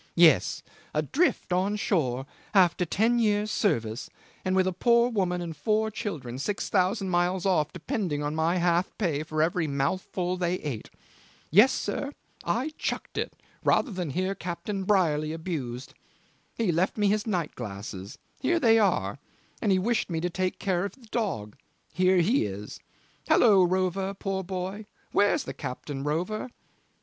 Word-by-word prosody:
Yes. 170 -4 +5 0.3
Adrift 180 - +1
on 190 +3 +1
shore 135 - 0 0.3
after 180 -2 +4
ten 225 +8 +2
years' 210 -1 +2
service 115 - 0 0.3
and 185 0 0
with 190 -1 +4
a 185 - 0
poor 235 +5 +3
woman 180 -5 0
and 165 -2 -6
four 220 +6 +1
children 155 - -5
six 205 +8 -2
thousand 190 +1 +1
miles 175 +1 +1
off 155 -6 +2
depending 180 - -2
on 145 +1 -1
my 160 +2 +1
half 175 +1 +2
pay 165 -8 0
for 155 0 0
every 165 0 0
mouthful 175 +6 -1
they 180 0 0
ate. 140 -11 -5 0.6
Yes, 210 - +7
sir! 280 +1 -3 0.3
I 245 - -1
chucked - - -3
it - - -3 0.3
rather 260 - +3
than 180 -5 -3
hear 185 +6 -1
Captain 185 +2 -4
Brierly 155 -6 +2
abused. 140 -7 -5 0.6
He 225 -6 +2
left 175 +6 0
me 205 -1 +3
his 210 +2 +1
night 175 -7 -1
glasses 100 -3 -7 0.2
here 335 +6 +2
they 225 -5 +5
are; 140 - +1 0.4
and 210 - +2
he 190 - +4
wished 220 +4 0
me 165 -2 -1
to 180 +1 -1
take 185 +1 -1
care 180 -2 0
of 200 -1 -3
the 260 -3 -18
dog 190 - -2 0.4
here 185 +1 +3
he 205 - +2
is. 100 +1 -7 0.5
Hallo, 205 -5 +6
Rover, 185 +2 0
poor 195 -1 -2
boy. 190 +3 -5 0.2
Where's 205 0 +3
the 135 - -6
captain, 135 +1 -5
Rover?" 180 - -2
185 Hz, 160 wpm, -27 LUFS, 155-205 Hz, 0.6 s, Yes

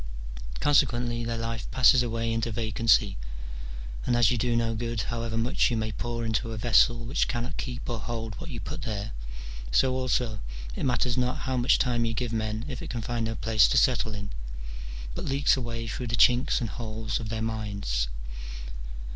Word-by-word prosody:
Consequently, 120 -4 +3
their 115 0 -2
life 115 -1 -3
passes 130 0 +6
away 115 -1 -1
into 115 +1 0
vacancy, 110 - +2 0.8
and 120 - +2
as 120 -3 +5
you 125 - +1
do 120 +1 +1
no 115 -1 +1
good 115 0 -2
however 115 +3 -2
much 115 +3 +2
you 120 - 0
may 110 0 -1
pour 115 +3 -3
into 110 +1 0
a - - -5
vessel 120 +1 +4
which 130 +5 +1
cannot 125 +3 -2
keep 125 -2 -4
or 120 -2 -2
hold 115 0 -4
what 170 - -6
you 120 -6 -5
put 150 - -5
there, 110 -4 -3 0.6
so 130 - +4
also 125 -4 0 0.4
it - - -2
matters 125 0 +1
not 125 0 0
how 130 - 0
much 125 0 +4
time 120 -2 +2
you 115 -1 -1
give 120 0 -1
men 110 +1 -1
if 130 -4 -5
it - - -6
can 120 -2 -3
find 120 0 -1
no 115 - -2
place 110 -2 +4
to - - +2
settle 115 -4 +3
in, 100 -1 -5 0.8
but - - -4
leaks 140 +1 +3
away 115 -3 -3
through 125 +3 -3
the 115 - +1
chinks 125 +1 +5
and 115 -4 -2
holes 110 -1 -3
of 110 - -5
their 110 0 -2
minds. 100 - -1
115 Hz, 190 wpm, -28 LUFS, 110-120 Hz, 0.8 s, passes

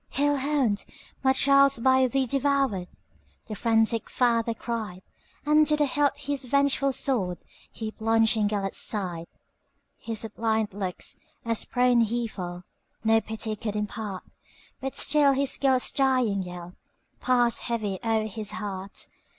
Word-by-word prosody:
"Hell 290 +1 +1
hound! 265 -7 0 0.4
my 265 - +5
child 275 +1 +5
's - - -2
by 260 +2 +4
thee 265 +2 +1
devoured,"The 265 -6 -3
frantic 225 0 +1
father 230 -2 +1
cried; 215 -6 -5 0.4
And 300 +1 +4
to 300 - +3
the 295 - +3
hilt 285 +1 +1
his 285 -1 -3
vengeful 280 +1 +2
swordHe 220 -3 -3
plunged 225 +1 +3
in 215 -2 +1
Gêlert's 200 -2 -2
side. 175 -6 -2 0.7
His 225 -2 -3
suppliant 220 -1 -1
looks, 190 -3 -4 0.3
as 230 -1 -1
prone 245 -1 +3
he 235 +2 0
fell, 180 -4 -7 0.4
No 225 0 +4
pity 220 0 -4
could 210 -1 -4
impart; 210 -2 -4 0.6
But 270 0 -5
still 285 -1 +4
his 275 0 +1
Gêlert's 265 -2 +2
dying 255 -7 +2
yellPassed 185 +7 -2
heavy 215 -5 -3
o'er 225 -1 +1
his 215 -1 -4
heart. 195 -2 -5
230 Hz, 135 wpm, -26 LUFS, 210-265 Hz, 0.7 s, my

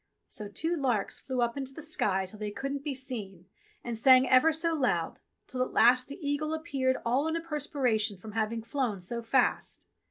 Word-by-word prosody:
So 210 - -6
two 325 +12 -2
larks 250 -9 0
flew 260 -2 -2
up 235 0 -1
into 270 -1 -6
the - - -7
sky 195 -11 0
till 205 +3 -12
they 210 -1 -3
couldn't 275 +7 -4
be 290 -2 -3
seen 215 -9 -6 0.4
and 240 -1 -3
sang 255 +3 +6
ever 255 +6 +6
so 325 +1 0
loud, 245 - 0 0.3
till 255 - -4
at 255 - -1
last 250 +2 +5
the 280 - -8
eagle 305 +2 -1
appeared 275 -5 0
all 260 +6 +2
in 320 - -1
a - - 0
perspiration 270 - -1
from 215 +4 -10
having 225 +1 -1
flown, 230 -4 -2
so 235 +6 -4
fast. 245 +3 0
255 Hz, 195 wpm, -29 LUFS, 220-285 Hz, 0.4 s, sang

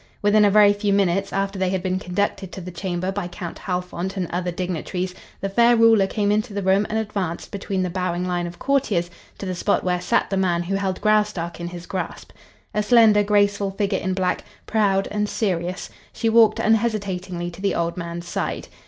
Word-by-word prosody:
Within 210 +1 +5
a 205 - +6
very 205 0 +6
few 205 0 0
minutes 195 0 +1
after 195 0 -2
they 190 -1 +1
had 185 -1 -2
been 185 0 0
conducted 190 0 -2
to - - -6
the 180 0 -7
chamber 180 +1 -3
by 195 -2 -3
Count 175 -1 -7
Halfont 180 +1 -3
and 185 - 0
other 180 +1 -1
dignitaries, 180 +1 -3 0.3
the 195 - -1
fair 235 +4 +4
ruler 225 -3 +5
came 205 0 0
into 215 0 -1
the 200 - -2
room 195 +2 +3
and 220 - -1
advanced 200 -6 -3
between 195 -2 -2
the 180 - -1
bowing 180 -1 -2
lines 175 -1 -1
of 175 0 -9
courtiers 215 -11 0 0.3
to - - -6
the 185 - -2
spot 200 +3 0
where 180 -1 0
sat 180 - +1
the 195 - +1
man 175 -2 +1
who 185 +3 -3
held 195 -1 -1
Graustark 210 -6 +1
in 170 - -4
his 175 0 -8
grasp. 185 -1 -5 0.4
A 210 - +1
slender, 215 -1 +5
graceful 205 -1 +2
figure 195 0 -1
in 185 0 -2
black, 185 -1 0 0.2
proud 200 -3 +1
and 210 0 -1
serious, 180 -3 -2 0.2
she 225 - -1
walked 225 -1 +5
unhesitatingly 195 -6 0
to 175 - -12
the 200 - 0
old 170 0 -1
man's 170 0 -6
side. - - -3
195 Hz, 205 wpm, -22 LUFS, 180-205 Hz, 0.4 s, a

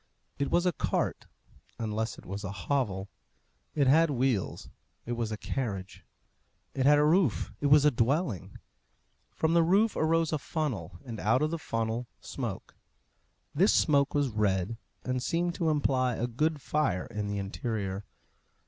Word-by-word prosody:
It 140 - 0
was 175 +1 +2
a 180 - +4
cart, - - -2 0.5
unless 110 0 -2
it - - -13
was 100 +2 -5
a 100 - -4
hovel. 100 -1 -1 0.7
It 145 -3 +3
had 160 +5 +5
wheels 125 -7 0 0.4
it 120 - -5
was 115 -2 -2
a 110 - -3
carriage. 100 -7 -4 0.7
It 130 0 +1
had 145 0 +7
a 150 - +4
roof 155 - +2
it 145 - +2
was 145 +1 +6
a 150 - +6
dwelling. 125 - 0 0.8
From 160 +1 +1
the 170 - +5
roof 200 +7 +3
arose 165 0 +2
a 155 - 0
funnel, 130 - -3
and 115 -4 -6
out 115 +7 +2
of 155 - 0
the 165 - -2
funnel 115 -2 -2
smoke. - - -6 0.8
This 185 +8 +4
smoke 140 -3 +3
was 145 -2 +2
red, 105 -1 0 0.3
and 130 0 -1
seemed 170 +5 0
to 165 -2 0
imply 130 -5 +1
a 120 - -1
good 150 +5 -1
fire 105 -12 0
in 105 -2 -4
the 100 0 -2
interior. 100 -1 -3
130 Hz, 160 wpm, -29 LUFS, 110-155 Hz, 0.8 s, had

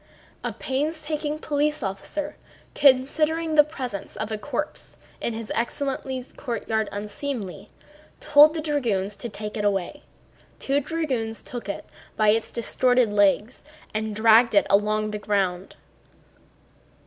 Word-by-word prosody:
A - - -2
painstaking 300 +2 -2
police 300 0 0
officer, 195 +10 -4 0.4
considering 305 +4 +3
the 300 -1 +7
presence 255 -9 -6
of 215 0 -4
a 215 - -1
corpse 290 +4 -5 0.2
in 235 - -1
his 225 -1 -6
excellency's 260 +1 -3
courtyard 225 -4 -2
unseemly, 210 -1 -5 0.5
told 300 +2 +6
the 315 - -2
dragoons 230 -10 -1
to 235 - -5
take 210 +1 -6
it 210 - -2
away. 200 +7 -1 0.6
Two 275 +1 +1
dragoons 265 -8 -2
took 240 -5 -7
it - - -4 0.3
by 215 -1 +4
its 220 +1 +2
distorted 245 -1 +2
legs 205 +4 +2 0.3
and 215 0 -2
dragged 225 +1 +5
it 200 - +5
along 215 +1 +2
the 210 - -4
ground. 195 -3 -1
235 Hz, 125 wpm, -25 LUFS, 210-290 Hz, 0.6 s, the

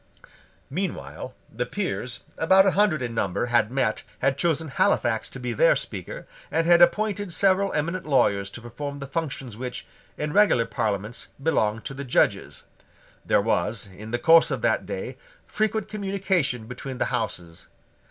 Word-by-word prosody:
Meanwhile 185 +4 -4
the 125 +2 -4
Peers, 150 -11 -3
about 190 +4 +5
a 195 - +4
hundred 185 -9 +2
in 120 -1 -3
number, 100 -1 -1
had 115 -1 +3
met, 125 -5 0 0.2
had 135 +1 +1
chosen 160 0 0
Halifax - - +1
to - - -8
be - - -3
their - - +4
Speaker, - - -5 0.2
and 165 - +1
had 175 0 +6
appointed 205 +1 +3
several 195 +2 +3
eminent 170 +3 -2
lawyers 100 -8 +2
to 120 - -9
perform 140 +5 -6
the 140 - -6
functions 140 -5 -4
which, 125 +2 -5 0.3
in 150 0 -3
regular 205 - +4
Parliaments, 105 0 -3
belong 115 -7 +1
to - - -6
the 140 +1 -6
judges. 130 - +1 0.6
There - - +3
was, 105 -1 0
in 110 +3 -9
the 120 - 0
course 165 +5 +6
of - - -3
that - - +1
day, - - -5 0.3
frequent 215 -1 -1
communication 195 - -1
between 125 +2 -7
the - - +1
Houses. 85 -2 -4
140 Hz, 160 wpm, -25 LUFS, 120-185 Hz, 0.6 s, had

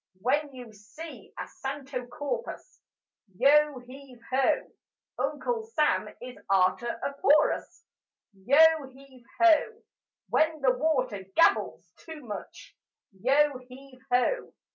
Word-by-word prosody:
When 285 +7 0
you 245 -4 -11
see 210 +11 -12
a - - -5
santo 270 -2 -6
corpus, 470 - -6 0.6
Yo 295 +2 +4
heave 260 -1 -13
ho! 260 +1 +1 0.5
Uncle 480 -2 -2
Sam 440 -9 0
is 250 -4 -10
arter 195 +5 +1
a 280 - -2
porpus: 300 +2 +2 0.5
Yo 200 +9 0 0.3
heave 265 -2 -18
ho! 345 +7 +4 0.5
When 315 0 +1
the 255 -2 +3
water 255 -8 -1
gabbles 330 - +2
too 320 -3 -11
much, 210 -3 -9 0.4
Yo 270 +7 +2
heave 255 +1 -15
ho! 255 - +1
270 Hz, 110 wpm, -27 LUFS, 250-300 Hz, 0.6 s, Yo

